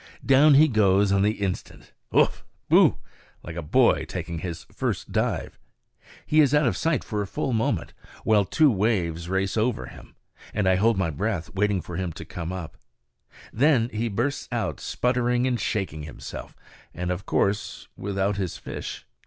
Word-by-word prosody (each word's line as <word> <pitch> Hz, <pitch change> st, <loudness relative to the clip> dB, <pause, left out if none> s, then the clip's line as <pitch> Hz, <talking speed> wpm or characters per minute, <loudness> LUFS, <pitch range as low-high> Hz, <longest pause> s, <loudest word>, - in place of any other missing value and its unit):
Down 140 Hz, +2 st, +6 dB
he 155 Hz, +3 st, +7 dB
goes 100 Hz, -5 st, +3 dB
on 100 Hz, 0 st, +3 dB
the 105 Hz, +2 st, +3 dB
instant, 100 Hz, -4 st, -5 dB, 0.2 s
ugh! -, -, +4 dB, 0.4 s
boo! -, -, +5 dB, 0.5 s
like 80 Hz, -, -7 dB
a 85 Hz, -, -3 dB
boy 75 Hz, -, +3 dB
taking 85 Hz, -1 st, -5 dB
his 85 Hz, -1 st, -6 dB
first -, -, -3 dB
dive. -, -, -1 dB, 0.7 s
He 155 Hz, +1 st, +4 dB
is 145 Hz, -1 st, +4 dB
out 150 Hz, 0 st, +4 dB
of 115 Hz, -7 st, +1 dB
sight 160 Hz, +7 st, 0 dB
for 105 Hz, -2 st, -3 dB
a 100 Hz, -, -3 dB
full 130 Hz, +6 st, -2 dB
moment, 115 Hz, 0 st, -1 dB, 0.3 s
while 105 Hz, -2 st, +4 dB
two 150 Hz, -, +3 dB
waves 90 Hz, -6 st, 0 dB
race 95 Hz, 0 st, 0 dB
over 115 Hz, +2 st, 0 dB
him, -, -, -13 dB, 0.4 s
and 100 Hz, -2 st, +1 dB
I 95 Hz, -, +5 dB
hold 110 Hz, +2 st, +3 dB
my 95 Hz, -4 st, 0 dB
breath 90 Hz, +1 st, -3 dB
waiting 100 Hz, -1 st, +1 dB
for 85 Hz, +2 st, -7 dB
him 95 Hz, -2 st, -2 dB
to -, -, -9 dB
come 85 Hz, 0 st, -6 dB
up. 90 Hz, -4 st, -7 dB, 0.8 s
Then 125 Hz, -2 st, +3 dB
he 115 Hz, 0 st, -2 dB
bursts 120 Hz, +8 st, -2 dB
out, -, -, -2 dB
sputtering 125 Hz, 0 st, 0 dB
and 125 Hz, -2 st, 0 dB
shaking 95 Hz, -7 st, -2 dB
himself, 75 Hz, 0 st, -8 dB, 0.4 s
and 90 Hz, +1 st, -2 dB
of 90 Hz, +2 st, -5 dB
course 100 Hz, +1 st, -1 dB
without 100 Hz, 0 st, -1 dB
his 95 Hz, -4 st, -3 dB
fish. -, -, -7 dB
100 Hz, 170 wpm, -25 LUFS, 95-120 Hz, 0.8 s, he